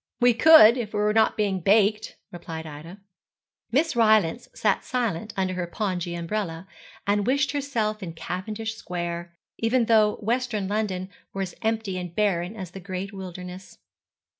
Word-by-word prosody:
'We 245 0 +5
could, 240 -2 +8
if 220 -3 -5
we - - 0
were 210 0 +2
not 220 0 +3
being 200 -3 0
baked,' 210 +3 +2 0.2
replied 165 -2 -7
Ida. 155 +5 -9 0.7
Miss 290 +4 +2
Rylance 215 -3 +3
sat 210 -2 +1
silent 220 -5 -2
under 190 -1 0
her 180 -1 -3
pongee 175 -2 -3
umbrella, 170 -1 -4 0.4
and 205 +1 +1
wished 280 +3 +2
herself 235 -7 -2
in 170 -4 -6
Cavendish 210 +7 -4
Square; 175 -3 -5 0.2
even 230 +1 +2
though 215 -2 +4
western 230 -2 -1
London 195 -2 -2 0.2
were 195 - -2
as 180 - -6
empty 220 -4 -1
and 175 -1 -7
barren 195 -2 0
as 185 -5 -7
the 195 - -8
great 190 +1 -5
wilderness. 185 -1 -9
205 Hz, 155 wpm, -25 LUFS, 180-220 Hz, 0.7 s, could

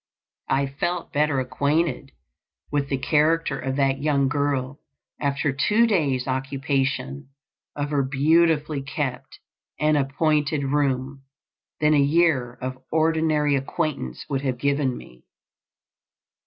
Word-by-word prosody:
I 135 +1 +2
felt 165 +6 -3
better 150 -2 +2
acquainted 140 +2 -1 0.6
with 145 -1 -1
the 135 - 0
character 155 0 +1
of 130 +1 -3
that 135 -1 +1
young 140 -2 +2
girl 140 -1 -1 0.4
after 140 0 0
two 210 - +3
days 145 - +1
occupation 135 - -2 0.5
of 145 0 -3
her 145 -2 +2
beautifully 150 +2 +2
kept 135 -2 -4 0.4
and 155 0 +3
appointed 145 +1 +1
room 135 -1 -1 0.6
than 150 0 +4
a 150 - +4
year 140 -4 +2
of 130 0 -5
ordinary 155 -2 +2
acquaintance 135 - -3
would 135 -1 -2
have 130 -3 -2
given 140 -1 0
me. 60 0 -14
140 Hz, 115 wpm, -24 LUFS, 135-150 Hz, 0.6 s, than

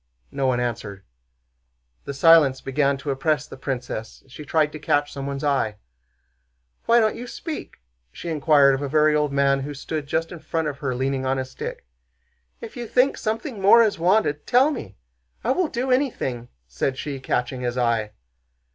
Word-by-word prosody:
No 135 - -1
one 125 -1 +1
answered. 105 -5 -4 1.0
The 140 - -4
silence 145 -3 +6
began 140 +1 0
to 140 +1 -4
oppress 145 +2 0
the - - -11
princess 125 -4 -5
and 135 - -24
she 145 +4 -9
tried 155 0 +1
to 155 - -8
catch 145 -1 0
someone's 140 0 -5
eye. 135 -7 +1 1.1
"Why 235 +1 +6
don't 220 -1 +2
you 245 - -7
speak?" 310 +5 -7 0.4
she - - -9
inquired 145 -3 +4
of 135 - -2
a 140 - -3
very 155 +1 +4
old 150 -1 +1
man 140 0 +2
who 145 +2 -5
stood 150 +1 -5
just 165 +3 -1
in 175 - -8
front 160 0 -2
of 140 -2 -5
her 130 -3 -2
leaning 135 +1 -1
on 130 0 0
his 130 0 -4
stick. - - -7 0.8
"If - - -9
you 240 -1 -5
think 255 +5 +3
something 220 +1 -4
more 230 +4 +7
is 215 -6 0
wanted, 175 -4 +1
tell 260 +5 +4
me! - - -7 0.5
I - - +1
will 365 -2 +1
do 260 -1 -2
anything," 180 - -1 0.2
said 70 - -2
she, 140 -1 -5
catching 125 0 -2
his 125 0 -2
eye. 115 -3 +1
145 Hz, 180 wpm, -23 LUFS, 130-165 Hz, 1.1 s, more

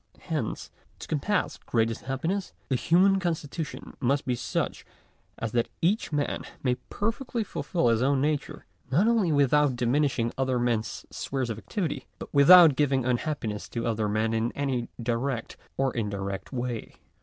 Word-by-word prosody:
Hence, - - -3 0.3
to - - -9
compass 185 +7 -1
greatest 115 -1 0
happiness, 165 +9 -2 0.2
the 135 - +2
human 185 +8 +4
constitution 165 -3 -4
must 140 +2 +1
be 125 - +1
such 120 - -2 0.5
as 115 - -3
that 120 0 +1
each 195 +5 +1
man 145 -1 -1 0.2
may 125 -2 +2 0.2
perfectly 230 +2 -2
fulfil 175 -8 -1
his 115 0 +2
own 135 +1 +3
nature, 150 +1 -2 0.2
not 170 - +3
only 225 -8 +3
without 145 -1 +3
diminishing 125 -1 +1
other 130 -1 +1
men's 120 -2 -1
spheres 130 -3 -3
of 110 - -5
activity, 160 - -3
but - - -9
without 155 +1 +9
giving 135 -3 +2
unhappiness 120 -4 -2
to 115 -1 -3
other 110 -2 0
men 110 +2 0
in 115 +2 0
any 130 -4 -2
direct 120 +1 -2 0.2
or 135 -1 +1
indirect 100 -3 -3
way. 120 -3 -4
135 Hz, 150 wpm, -27 LUFS, 120-155 Hz, 0.5 s, without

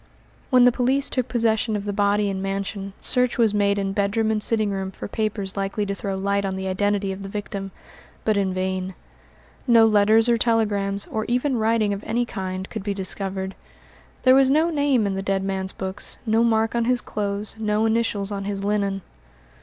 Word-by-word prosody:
When 255 -2 +6
the 250 - +7
police 265 +3 +1
took 255 -2 0
possession 225 -2 +1
of 205 -1 -3
the 205 - -2
body 205 0 +2
and 190 -1 -4
mansion, 195 0 -4
search 250 -1 +1
was 225 -3 +3
made 200 -1 +2
in 195 -1 -1
bedroom 215 +2 +1
and 215 -1 0
sitting 215 -2 +2
room 190 -1 -3
for 190 - -7
papers 205 -2 -3
likely 195 +1 -2
to 200 - -2
throw 195 -1 -4
light 200 +1 0
on 190 -1 -2
the 190 0 -4
identity 200 +1 0
of 190 +1 -6
the 195 - -6
victim, 200 -1 -5 0.6
but 215 - +2
in 195 -2 +1
vain. 185 0 -2 0.7
No 230 -2 +7
letters 215 +1 +4
or 235 -1 +3
telegrams, 205 -4 +1
or 220 - -1
even 250 +3 0
writing 220 -2 +2
of 200 +1 -6
any 240 +1 0
kind, 190 -4 -5
could - - -6
be 200 0 -3
discovered; 190 0 -3 0.7
there 255 - +7
was 265 0 +5
no 315 +4 +3
name 285 -7 +2
in 200 - -1
the 190 - -2
dead 195 0 -1
man's 190 -1 -2
books, 190 +1 -6
no 225 +1 +3
mark 225 -1 +2
on 235 -1 +1
his 250 0 +2
clothes, 205 -2 -3
no 215 0 +1
initials 220 -3 0
on 200 -1 -4
his 200 -1 -3
linen. 200 -2 -1
205 Hz, 200 wpm, -23 LUFS, 195-225 Hz, 0.7 s, the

